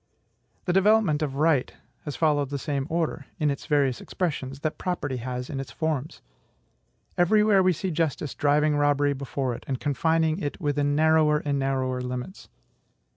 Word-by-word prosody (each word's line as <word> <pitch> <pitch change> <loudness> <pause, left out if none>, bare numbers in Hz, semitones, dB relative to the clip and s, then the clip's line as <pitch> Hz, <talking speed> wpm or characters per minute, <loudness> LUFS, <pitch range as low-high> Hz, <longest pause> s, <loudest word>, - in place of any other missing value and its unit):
The 180 - +1
development 195 -5 +3
of 140 -3 -2
right 150 -3 +2 0.3
has 145 - -4
followed 145 -4 +1
the 140 - -3
same 140 -1 -2
order, 160 -3 -2
in 150 -1 +1
its 140 - -6
various 140 -4 +1
expressions, 140 -6 -3
that 155 -1 -3
property 145 -8 -2
has 125 +1 -4
in 140 - -5
its 135 - -6
forms. 155 -3 -3 1.0
Every 210 +5 +4
where 205 -3 +4
we 185 0 +4
see 180 +2 -3
justice 155 -2 -1
driving 150 +1 +2
robbery 145 0 +2
before 135 -1 -3
it - - -8
and 130 -2 -2
confining 160 +3 +1
it 145 -2 -4
within 145 -3 0
narrower 155 0 +4
and 140 -1 0
narrower 130 -2 -1
limits. 125 +8 -6
145 Hz, 165 wpm, -26 LUFS, 135-160 Hz, 1.0 s, Every